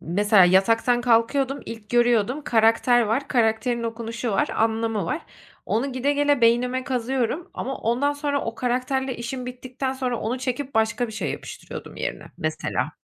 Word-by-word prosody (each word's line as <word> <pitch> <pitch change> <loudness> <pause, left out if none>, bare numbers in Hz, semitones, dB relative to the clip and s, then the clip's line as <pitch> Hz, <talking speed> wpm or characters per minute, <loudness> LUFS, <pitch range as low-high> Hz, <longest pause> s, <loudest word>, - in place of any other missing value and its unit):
...mesela 205 +3 +4
yataktan 225 +7 +3
kalkıyordum, 250 +4 +2
ilk 225 -2 -9
görüyordum, 240 +3 +2
karakter 230 +2 +4
var, 230 +6 -1
karakterin 235 0 +1
okunuşu 230 +1 -4
var, 195 - +1
anlamı 225 -2 0
var. 240 - -3 0.4
Onu 260 +5 0
gide 260 +3 +1
gele 290 -1 +2
beynime 250 +2 +2
kazıyorum 260 +5 -2
ama 270 +1 -4
ondan 255 +6 +1
sonra 285 -1 -1
o 230 - -4
karakterle 255 +2 -1
işim 250 +2 -5
bittikten 255 +1 -4
sonra 255 -3 -2
onu 235 +4 -2
çekip 260 +1 -3
başka 220 +2 +1
bir 220 - -9
şey 215 - -3
yapıştırıyordum - - -9
yerine - - -4
mesela. - - -2
240 Hz, 150 wpm, -24 LUFS, 225-265 Hz, 0.4 s, mesela